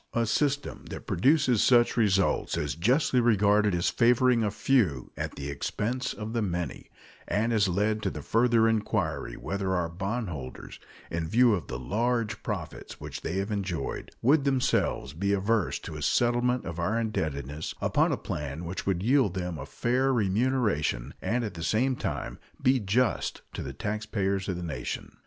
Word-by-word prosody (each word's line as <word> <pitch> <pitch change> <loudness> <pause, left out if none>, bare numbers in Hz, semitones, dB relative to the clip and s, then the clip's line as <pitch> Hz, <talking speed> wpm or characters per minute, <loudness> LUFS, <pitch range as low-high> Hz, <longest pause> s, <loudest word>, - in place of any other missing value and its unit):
A 115 -1 +2
system 145 +5 -1
that - - -8
produces 130 - +3
such 120 -2 +4
results 100 -5 +2
is 75 -1 -1
justly 125 - +2
regarded 105 -3 +3
as 85 - +1
favoring 120 0 +4
a 105 - +1
few 100 - +1
at - - -4
the 70 - -5
expense 120 - -2
of 105 +2 -6
the 115 - 0
many, 90 -7 -3 0.4
and 110 +3 +1
has 110 -3 +3
led 105 +4 0
to - - 0
the - - -7
further 115 -1 +3
inquiry 110 -2 -1
whether 95 -1 -2
our 85 -2 0
bondholders, 90 - -5 0.3
in 80 -1 -2
view 120 +3 +5
of 90 -8 -2
the - - -4
large 110 - -1
profits 95 -8 -6
which - - -7
they 80 - -3
have 100 +3 -2
enjoyed, 95 -8 -3
would 140 +4 +4
themselves 130 - +1
be 100 +5 0
averse 100 -1 +1
to 80 - -8
a 75 - -6
settlement 120 - +2
of 85 -1 -5
our 105 +7 0
indebtedness 75 - -3
upon - - +2
a - - 0
plan 75 +3 -5
which 90 +4 -5
would 95 -2 0
yield 120 -5 +3
them 90 -3 -3
a - - -7
fair 130 +3 +1
remuneration 105 - +1
and 120 +2 0
at 110 - -4
the 85 - -8
same 120 +10 +1
time - - -4 0.2
be 130 0 +3
just 115 +3 0
to - - -4
the - - -5
taxpayers 100 -2 -2
of 90 - -1
the 90 - -5
nation. 80 -3 -5
105 Hz, 170 wpm, -28 LUFS, 90-120 Hz, 0.4 s, view